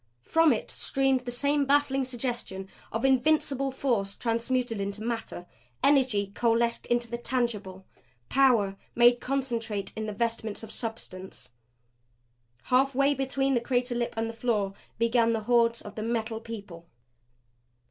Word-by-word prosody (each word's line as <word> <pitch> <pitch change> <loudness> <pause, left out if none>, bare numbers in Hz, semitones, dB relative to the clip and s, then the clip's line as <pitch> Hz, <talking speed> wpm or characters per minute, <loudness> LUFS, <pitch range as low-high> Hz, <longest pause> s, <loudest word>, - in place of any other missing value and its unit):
From 325 - +4
it 225 - -1
streamed 270 -1 +1
the 245 - -3
same 285 +4 +1
baffling 275 -1 +2
suggestion 240 -6 -4 0.2
of 225 +4 -1
invincible 275 0 +2
force 235 -7 -1
transmuted 235 -1 -1
into 200 +2 -4
matter; 225 -6 -4 0.4
energy 250 -8 +3
coalesced 235 +1 +1
into 240 0 +1
the 235 +1 -5
tangible; 210 -7 -2 0.4
power 240 -8 +3 0.2
made 240 0 +6
concentrate 235 -7 -2
in 220 0 -3
the 210 - -3
vestments 225 -1 -2
of 220 - -8
substance. 190 - -6 1.1
Half 265 +1 +2
way 275 +2 +4
between 270 -1 0
crater 245 0 0
lip 240 0 -2
and 225 0 -1
floor 220 -4 0 0.2
began 230 0 +3
the 225 - -1
hordes 235 +1 +2
of 205 - -9
the 215 - -5
Metal 225 0 -2
People. 200 -7 -9
235 Hz, 135 wpm, -28 LUFS, 220-260 Hz, 1.1 s, made